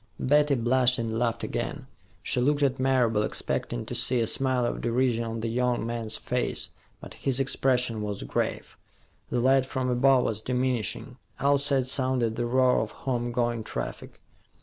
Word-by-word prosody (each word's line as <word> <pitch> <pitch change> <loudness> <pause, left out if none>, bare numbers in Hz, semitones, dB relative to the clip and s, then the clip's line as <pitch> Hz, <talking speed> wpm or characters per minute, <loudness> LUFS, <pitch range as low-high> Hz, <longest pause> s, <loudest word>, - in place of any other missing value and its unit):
Betty 145 +1 +3
blushed 125 +1 +2
and 115 -1 -2
laughed 115 -1 -1
again. - - -4 0.4
She 125 - 0
looked 145 +3 +2
at 135 -2 +1
Marable, 125 -5 +2
expecting - - -2
to - - -6
see 125 - +2
a 115 - +2
smile 130 +1 +1
of - - -3
derision 120 0 +1
on 115 0 -4
the 115 - -2
young 120 0 0
man's 115 -2 -4
face, 125 0 -2 0.3
but - - -10
his 135 -1 -1
expression 125 -4 +1
was 105 -1 -4
grave. - - -3 0.5
The 125 - 0
light 130 +1 +3
from 130 -2 -2
above 130 +1 +4
was 110 -1 -2
diminishing; 125 0 -1 0.2
outside 140 -1 +2
sounded 130 -3 0
the 120 - -1
roar 130 +1 +3
of 110 - -3 0.2
home 120 -2 -1
going 120 -1 -1
traffic. 60 - -6
125 Hz, 165 wpm, -27 LUFS, 115-130 Hz, 0.5 s, above